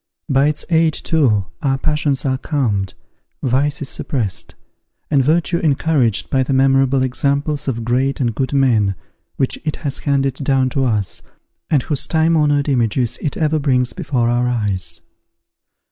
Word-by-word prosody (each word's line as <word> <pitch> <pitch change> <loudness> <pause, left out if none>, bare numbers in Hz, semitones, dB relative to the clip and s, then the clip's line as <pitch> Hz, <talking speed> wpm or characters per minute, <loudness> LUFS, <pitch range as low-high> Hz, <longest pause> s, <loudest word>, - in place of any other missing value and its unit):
By 135 -1 +3
its 150 0 -1
aid, 160 -1 +3
too, 120 - +1 0.2
our 135 -3 +1
passions 150 -1 0
are 130 -1 0
calmed, 105 - -1 0.5
vice 140 +3 0
is 135 - -5
suppressed, 110 -9 -3 0.6
and 140 -3 +4
virtue 170 +4 +2
encouraged 140 - +1
by 135 - +2
the 130 +1 -1
memorable 135 0 +3
examples 140 +3 -1
of 115 -3 -2
great 130 +3 0
and 120 -4 0
good 130 +4 -2
men 115 -8 +2 0.4
which 135 - -1
it 155 - -2
has 140 -1 -1
handed 135 -2 0
down 135 -1 +1
to 135 -3 0
us, 105 -5 -1 0.5
and 140 -5 +2
whose 145 -3 -1
time 160 +1 +2
honoured 145 -2 +2
images 120 -2 0
it 150 - -3
ever 155 -1 +1
brings 125 -3 +1
before 120 -4 -1
our 120 +1 +1
eyes. 95 -8 -2
135 Hz, 155 wpm, -18 LUFS, 125-145 Hz, 0.6 s, and